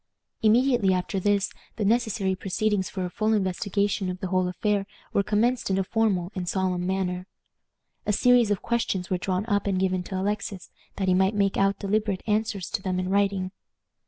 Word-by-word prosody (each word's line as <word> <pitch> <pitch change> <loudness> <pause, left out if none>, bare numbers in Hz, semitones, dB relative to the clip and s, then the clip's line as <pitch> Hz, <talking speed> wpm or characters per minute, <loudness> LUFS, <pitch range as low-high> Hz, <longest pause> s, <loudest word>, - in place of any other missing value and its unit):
Immediately 230 -3 +4
after 180 +1 -2
this 200 0 +1 0.2
the 210 - -1
necessary 220 -3 +1
proceedings 195 +1 -1
for 185 -2 -3
a - - -3
full 215 +3 +1
investigation 200 0 0
of 180 0 -4
the 190 - -4
whole 185 -1 +2
affair 200 +2 0 0.3
were - - +3
commenced 225 +4 +1
in 190 - +1
a 195 - +2
formal 195 -4 0
and 180 -3 -3
solemn 185 -2 0
manner. 185 -1 -2 0.8
A - - +3
series 245 +1 +4
of 205 -2 -1
questions 200 -6 -1
were 180 - +1
drawn 185 +2 -1
up 205 -3 0
and 190 -2 +1
given 185 -1 +1
to 190 0 -3
Alexis, 200 -1 -3 0.2
that 190 - -2
he 185 - +4
might 190 +3 +3
make 200 -1 +2
out 195 0 +2
deliberate 205 -1 -1
answers 210 -3 0
to - - -1
them 185 -1 -1
in 185 0 -2
writing. 195 -1 +1
195 Hz, 190 wpm, -26 LUFS, 185-210 Hz, 0.8 s, Immediately